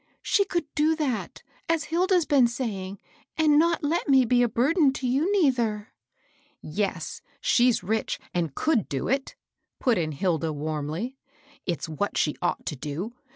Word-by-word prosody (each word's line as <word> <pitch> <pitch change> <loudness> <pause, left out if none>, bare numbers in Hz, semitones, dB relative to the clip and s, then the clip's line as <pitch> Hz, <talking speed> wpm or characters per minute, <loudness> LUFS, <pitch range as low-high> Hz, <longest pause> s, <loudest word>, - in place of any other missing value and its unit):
" - - -48
She 400 - +5
could 345 -4 -1
do 310 +1 +2
that, 280 -8 -3 0.3
as 330 -2 +2
Hilda's 350 +2 +2
been 270 -5 +4
saying, 205 -6 -4 0.4
and 305 -2 +5
not 335 0 +2
let: 315 +2 0
me 265 -2 +6
be 245 +1 +3
a 240 - +3
burden 275 - +3
to 270 - -5
you, 280 +10 +1
neither." 240 - +1 0.4
" 290 -1 -35
Yes; 175 0 -3 0.2
she's 245 -5 +3
rich 220 +4 -1 0.2
and 165 -5 -1
could 285 - +1
do 135 - -2
it," 270 +1 -1 0.4
put 245 -7 +2
in 155 -2 -2
Hilda, 160 +1 0
warmly; 155 - -4 0.3
and - - -29
it's 170 -5 -2
what 160 +6 -2
she 150 - +1
ought 175 - -1
to 150 - -3
do. 150 - -5
245 Hz, 170 wpm, -26 LUFS, 180-300 Hz, 0.4 s, me